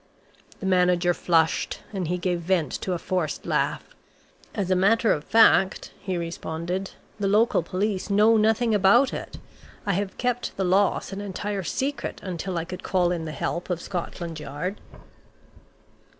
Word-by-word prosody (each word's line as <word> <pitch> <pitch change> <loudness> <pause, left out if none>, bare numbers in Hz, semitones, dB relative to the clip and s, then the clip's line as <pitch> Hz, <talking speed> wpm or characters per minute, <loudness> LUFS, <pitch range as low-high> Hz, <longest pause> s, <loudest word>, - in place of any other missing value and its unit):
The 195 - -6
manager 180 -1 +3
flushed, 165 -2 +1
and 185 -4 -2
he 180 +2 0
gave 180 -1 -1
vent 170 -4 0
to 185 - -1
a - - -1
forced 170 -3 -2
laugh. - - -1 0.6
"As 195 -3 -1
a - - +4
matter 215 +5 +3
of 150 - -3
fact," 205 -2 +4
he 185 -2 -3
responded, 170 +2 -4 0.3
"the 200 - 0
local 210 0 +3
police 190 +3 -2
know 210 +3 +5
nothing 220 +1 +3
about 210 +7 +5
it. - - -6 0.5
I 200 - +1
have 195 +1 -2
kept 245 -1 -2
the 195 - 0
loss 195 +2 +2
an 195 - -5
entire 205 0 -3
secret 270 - -3
until 180 -1 -4
I 165 - -2
could 180 +1 -7
call 180 -2 +1
in 170 -2 -2
the 155 - -4
help 170 +5 -3
of 175 -2 -1
Scotland 170 -2 -5
Yard." 150 +7 -5
185 Hz, 160 wpm, -25 LUFS, 175-205 Hz, 0.6 s, know